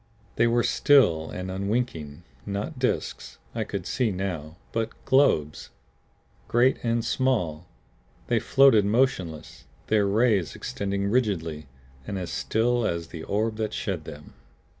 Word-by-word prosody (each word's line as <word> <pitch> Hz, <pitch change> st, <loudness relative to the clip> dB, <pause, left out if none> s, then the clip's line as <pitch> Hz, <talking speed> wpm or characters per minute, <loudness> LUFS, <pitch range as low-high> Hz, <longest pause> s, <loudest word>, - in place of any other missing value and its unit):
They 115 Hz, -, +3 dB
were 120 Hz, 0 st, +2 dB
still 85 Hz, -, +4 dB
and 90 Hz, +1 st, -5 dB
unwinking; 95 Hz, -6 st, -3 dB, 0.2 s
not 105 Hz, +8 st, -4 dB
disks, 125 Hz, -, -2 dB, 0.2 s
I -, -, -1 dB
could -, -, -5 dB
see 125 Hz, -3 st, 0 dB
now, 90 Hz, -4 st, -4 dB
but 115 Hz, -1 st, -1 dB, 0.2 s
globes. 130 Hz, -, +2 dB, 0.8 s
Great 120 Hz, +3 st, +3 dB
and 115 Hz, 0 st, 0 dB
small, 90 Hz, -, 0 dB, 0.6 s
they -, -, +1 dB
floated 135 Hz, -6 st, +5 dB
motionless, 100 Hz, -, -1 dB, 0.2 s
their 105 Hz, -2 st, +3 dB
rays 105 Hz, -4 st, +2 dB
extending 100 Hz, 0 st, -3 dB
rigidly 85 Hz, -, -1 dB, 0.4 s
and 100 Hz, -, -3 dB
as 90 Hz, -2 st, -4 dB
still 110 Hz, -, 0 dB
as 85 Hz, -5 st, -2 dB
the 80 Hz, -, -8 dB
orb 110 Hz, +5 st, -1 dB
that 110 Hz, -1 st, -2 dB
shed 90 Hz, -7 st, -3 dB
them. 75 Hz, 0 st, -10 dB
100 Hz, 130 wpm, -26 LUFS, 85-120 Hz, 0.8 s, floated